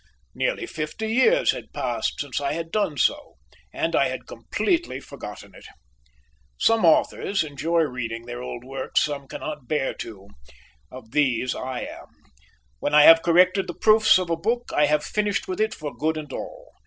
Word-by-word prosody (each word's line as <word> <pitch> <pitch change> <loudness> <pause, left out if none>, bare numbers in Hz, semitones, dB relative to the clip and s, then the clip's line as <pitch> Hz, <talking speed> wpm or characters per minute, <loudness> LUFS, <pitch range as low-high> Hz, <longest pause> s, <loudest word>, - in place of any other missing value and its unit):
Nearly - - -1
fifty 165 - -5
years 455 - +4
had - - -9
passed - - -2
since 145 -1 -3
I 140 0 -1
had 165 +1 -5
done 195 -8 0
so, 295 - 0 0.4
and - - -1
I - - +3
had - - -6
completely 345 - -2
forgotten - - -10
it. - - -14 0.9
Some 225 -4 +3
authors 170 +3 +2
enjoy 160 +3 0
reading 120 -5 -3
their 120 0 -6
old 120 -1 -6
works; 130 0 -1
some 140 -2 -4
cannot 150 -2 -7
bear 145 -3 0
to. 100 -3 -9 0.6
Of 125 -3 -12
these 130 -3 +1
I 130 -1 -5
am. - - -8 0.7
When 145 - 0
I 150 - +8
have 165 +1 +9
corrected 180 +3 +3
the 175 - -6
proofs 220 -1 +5
of 180 -2 -2
a - - +2
book, 235 +8 -2
I 150 - +4
have 150 0 +1
finished 210 -1 -1
with 185 +2 -3
it 220 0 0
for 150 -2 -7
good 160 +1 -1
and 150 -3 -7
all. - - -8
155 Hz, 175 wpm, -24 LUFS, 135-200 Hz, 0.9 s, have